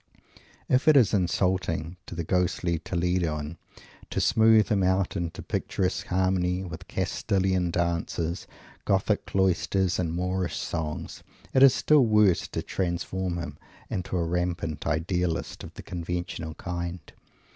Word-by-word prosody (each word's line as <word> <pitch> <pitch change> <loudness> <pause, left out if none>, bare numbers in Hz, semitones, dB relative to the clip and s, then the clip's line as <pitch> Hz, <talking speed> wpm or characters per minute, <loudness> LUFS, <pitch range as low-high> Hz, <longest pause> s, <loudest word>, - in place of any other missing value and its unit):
If 130 +4 +2
it 155 -2 +8
is 115 -6 +5
insulting 90 -3 0
to - - -7
the 85 - -2
ghostly 90 -1 0
Toledoan 85 -3 -1 0.5
to - - -2
smooth 110 -1 +5
him 105 -2 +2
out 95 +1 +1
into 85 -3 -4
picturesque 95 +1 -2
harmony 95 0 +1
with 85 -3 -8
Castillian 95 -2 0
dances, 85 0 -1 0.4
Gothic 100 +2 +1
cloisters 95 0 +1
and 85 -3 0
Moorish 90 0 -1
songs, 80 0 -4 0.3
it 130 - +4
is 135 -2 +8
still 145 -5 +4
worse 105 -4 +4
to - - -4
transform 90 0 -2
him 85 0 -6 0.3
into 90 0 -2
a 85 - +1
rampant 85 -3 -2
Idealist 85 +1 -1
of - - -8
the - - -9
conventional 85 -2 -4
kind. 85 -1 -4
90 Hz, 130 wpm, -27 LUFS, 85-95 Hz, 0.5 s, it